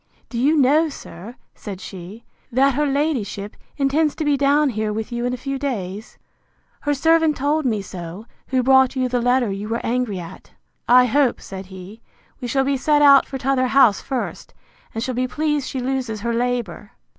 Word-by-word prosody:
Do 235 - -4
you 295 +5 +3
know, 300 +4 +4
sir, 215 - -10 0.2
said 200 -4 -8
she, 195 +4 -10 0.3
that 270 +3 +3
her 295 +3 0
ladyship 265 -9 -2 0.2
intends 290 +2 +1
to 315 - -3
be 295 -1 +3
down 285 +1 +3
here 215 -1 -2
with 220 +3 -4
you 240 0 -2
in 250 - -2
a - - -9
few 275 +2 -4
days? 215 -6 -5 0.6
Her 290 0 -1
servant 320 +1 +3
told 290 +1 0
me 215 -4 -1
so, 180 +2 -8 0.2
who 260 -1 +1
brought 265 0 +4
you 255 -1 0
the 245 -1 -1
letter 245 -2 +2
you 200 +2 -5
were 230 +1 -3
angry 240 -4 -1
at. 170 -2 -10 0.4
I 250 +1 +6
hope, 260 0 +2
said 190 -1 -9
he, 190 +4 -11 0.4
we 245 - -5
shall 270 +3 +1
be 275 0 0
set 295 +2 +2
out 280 -1 +7
for 270 - -5
t'other 260 0 +1
house 245 -6 +4
first; 265 -3 -5 0.4
and 225 - -2
shall 255 0 -2
be 255 +1 -1
pleased 295 +1 -1
she 265 - -4
loses 250 -4 -3
her 235 +1 -1
labour. 235 -5 -3
250 Hz, 190 wpm, -21 LUFS, 220-275 Hz, 0.6 s, out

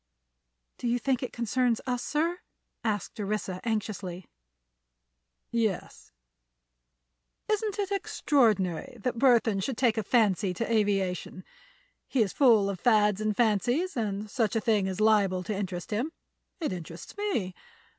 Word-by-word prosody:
"Do 245 - -2
you 240 +1 +2
think 260 0 0
it 255 - -4
concerns 240 0 0
us, 245 -2 -1
sir?" 335 +4 0 0.4
asked 215 0 -2
Orissa, 200 -3 -3
anxiously. 200 -5 -3 1.3
"Yes. 225 -5 -2 1.4
It 425 -1 +1 0.2
isn't 405 -1 -2
extraordinary 245 - +1
that 240 +1 -2
Burthon 235 -6 +4
should 230 +5 -2
take 235 -4 +2
a - - -2
fancy 200 -4 +2
to 230 +3 -2
aviation. 195 -4 0 0.6
He 250 -5 +2
is 195 - -4
full 230 -8 +5
of 195 -3 -3
fads 210 -3 +3
and 215 -1 -1
fancies, 245 - +1
and 210 -3 -2
such 220 -1 0
a - - +3
thing 210 -3 +2
is 190 0 -4
liable 200 -4 +3
to 210 +3 -3
interest 185 -2 -4
him. 240 +9 -1 0.5
It 310 - -2
interests 170 -1 -8
me. 365 - -1
215 Hz, 135 wpm, -28 LUFS, 195-245 Hz, 1.4 s, full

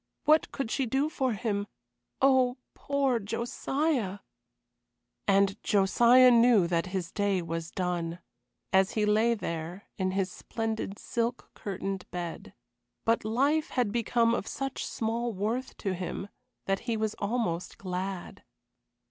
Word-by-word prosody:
What 310 +1 +4
could 270 -5 -3
she 265 -3 0
do 270 +6 +1
for 260 -5 0
him? 205 -2 -2 0.6
Oh, 260 -2 +4 0.2
poor 275 -4 0
Josiah! 230 +1 -1 1.1
And 195 0 +3
Josiah 235 +6 +6
knew 235 -5 +6
that 170 0 0
his 185 -2 -3
day 205 -2 +1
was 165 0 -4
done, 175 -2 -2 0.6
as 190 0 +4
he 215 -1 +1
lay 220 +3 +3
there 170 -1 -5 0.2
in 185 0 +1
his 190 -1 -1
splendid, 220 -2 -4
silk 235 +1 -3
curtained 195 -1 -4
bed. 175 -1 -6 0.5
But 230 0 +2
life 280 +8 +1
had 245 -5 0
become 230 0 +2
of 220 - -2
such 270 -1 -3
small 230 +1 -2
worth 220 +7 -2
to 195 -3 -2
him 185 +2 -4 0.4
that 195 0 +1
he 225 - +1
was 220 -1 -1
almost 200 -6 -2
glad. 185 0 -5
215 Hz, 130 wpm, -29 LUFS, 190-240 Hz, 1.1 s, Josiah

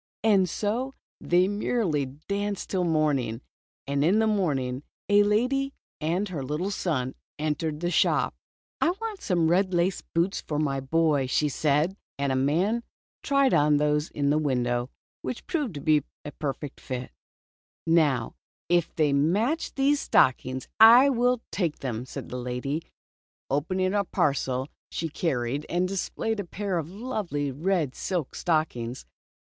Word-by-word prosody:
And 195 -5 +4
so 240 +9 -2 0.2
they 180 +2 +3
mer 210 +4 0
rily 145 -5 0 0.2
danced 200 0 -2
till 185 -2 +1
morning. 145 -8 +1 0.4
And 140 0 0
in 180 +7 +4
the 220 - +3
morning, 140 -12 0 0.3
a 205 0 +5
lady 250 +7 +1 0.2
and 170 +6 0
her 165 -6 -4
little 150 +9 -2
son 135 -10 -1 0.2
entered 155 0 -2
the 175 0 0
shop. - - +2 0.2
" - - -59
I - - +4
want 445 -3 -5
some 175 -5 +1
red 185 +2 +2
laced 175 +2 0
boots 170 +4 +1
for 150 - -4
my 140 -3 0
boy," 145 0 +1
said 150 +4 +1
she. 195 - -20 0.2
And 140 -1 0
the - - +1
man 175 - +1 0.4
tried 275 -2 +3
on 150 0 +4
those 150 +1 +1
in 140 -1 0
the 150 - +3
win 130 -5 +1
dow, 120 +1 -1 0.3
which 250 - -5
proved 290 - -2
a 150 -2 +4 0.4
perfect 145 -1 -4
fit. 125 -1 -5 0.7
Now 150 -8 +2 0.4
if 175 -1 +2
they 150 -3 +2
match 205 - +1
these 280 +1 +3
stockings, 130 - +2
I 235 +5 +9
will 245 -1 +1
take 170 -6 -1
them," 125 -2 -4
said - - -7
the 125 - -4
lady, 125 +5 -3 0.7
opening 185 +7 0
a 205 -1 +2
parcel 135 -6 0 0.2
she 165 - -3
carried 140 -3 -1
and 180 +1 +1
displaying 205 +3 -2
a - - -1
pair 195 0 -2
of 160 0 -5
lovely 190 - -3
red 160 -1 0
silk 175 -4 -3
stockings. 130 -8 -1
165 Hz, 155 wpm, -27 LUFS, 140-200 Hz, 0.7 s, I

